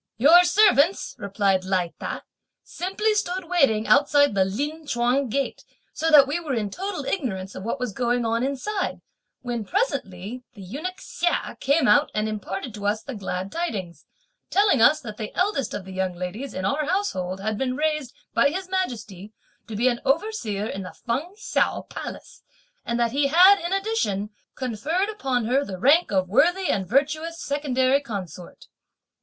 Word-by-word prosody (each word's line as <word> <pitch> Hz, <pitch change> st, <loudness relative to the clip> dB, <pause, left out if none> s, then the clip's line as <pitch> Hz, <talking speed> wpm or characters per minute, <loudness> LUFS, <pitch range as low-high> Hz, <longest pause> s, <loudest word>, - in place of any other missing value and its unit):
"Your 320 Hz, +9 st, +7 dB
servants," 385 Hz, -3 st, +3 dB
replied 200 Hz, -2 st, +1 dB
Lai 185 Hz, -2 st, -1 dB
Ta, -, -, -5 dB, 0.4 s
"simply 390 Hz, +4 st, -1 dB
stood 375 Hz, -3 st, -1 dB
waiting 270 Hz, -12 st, +2 dB
outside 285 Hz, +4 st, +4 dB
the 195 Hz, -1 st, +3 dB
Lin 295 Hz, +10 st, -4 dB
Chuang 245 Hz, +1 st, +1 dB
gate, 275 Hz, +4 st, -2 dB, 0.3 s
so 325 Hz, -, 0 dB
that 295 Hz, -3 st, +8 dB
we 290 Hz, +5 st, -2 dB
were 305 Hz, -6 st, -3 dB
in 210 Hz, -3 st, -2 dB
total 375 Hz, -, -4 dB
ignorance 205 Hz, -, -3 dB
of -, -, -7 dB
what 230 Hz, +7 st, -3 dB
was 250 Hz, -5 st, -3 dB
going 240 Hz, +1 st, 0 dB
on 230 Hz, +1 st, 0 dB
inside, 320 Hz, +10 st, -2 dB, 0.4 s
when 240 Hz, -3 st, -3 dB
presently 250 Hz, -, -2 dB
the 200 Hz, -, -10 dB
Eunuch 305 Hz, -, -5 dB
Hsia 350 Hz, 0 st, -2 dB
came 280 Hz, -1 st, +2 dB
out 210 Hz, -, +5 dB
and 215 Hz, 0 st, 0 dB
imparted 215 Hz, +2 st, -5 dB
to 205 Hz, -1 st, -4 dB
us 215 Hz, +1 st, 0 dB
the 275 Hz, -, -6 dB
glad 190 Hz, -2 st, -4 dB
tidings; 190 Hz, -, -4 dB, 0.4 s
telling 400 Hz, -, +3 dB
us 300 Hz, +6 st, +6 dB
that 215 Hz, -5 st, -8 dB
the 215 Hz, -2 st, -5 dB
eldest 365 Hz, -, 0 dB
of 190 Hz, -, -6 dB
the 190 Hz, -, -9 dB
young 185 Hz, -1 st, -2 dB
ladies 185 Hz, +10 st, -5 dB
in 185 Hz, -, -3 dB
our 290 Hz, +6 st, 0 dB
household 190 Hz, -, -1 dB
had 215 Hz, +2 st, -2 dB
been 255 Hz, -1 st, -1 dB
raised, 305 Hz, -4 st, -1 dB, 0.2 s
by 280 Hz, -, +4 dB
His 370 Hz, +4 st, -4 dB
Majesty, 220 Hz, -, -4 dB, 0.3 s
to 220 Hz, -, -6 dB
be 235 Hz, +5 st, +2 dB
an 240 Hz, -1 st, 0 dB
overseer 270 Hz, -, -1 dB
in 195 Hz, -3 st, -4 dB
the 185 Hz, -, -8 dB
Feng 285 Hz, +11 st, -2 dB
Ts'ao 435 Hz, +4 st, 0 dB
Palace, -, -, -8 dB, 0.4 s
and 235 Hz, 0 st, -2 dB
that 235 Hz, -1 st, +2 dB
he 280 Hz, +2 st, +2 dB
had, 365 Hz, +7 st, +7 dB
in 345 Hz, -, -3 dB
addition, 390 Hz, -, -1 dB, 0.2 s
conferred 285 Hz, -, -1 dB
upon 265 Hz, -, -1 dB
her 260 Hz, +5 st, +2 dB
the 195 Hz, -8 st, -6 dB
rank 290 Hz, -, +4 dB
of 190 Hz, -2 st, +1 dB
worthy 350 Hz, -, +3 dB
and 190 Hz, -2 st, -1 dB
virtuous 310 Hz, -, 0 dB
secondary 275 Hz, -2 st, +1 dB
consort. 190 Hz, -, -8 dB
255 Hz, 170 wpm, -24 LUFS, 210-325 Hz, 0.4 s, that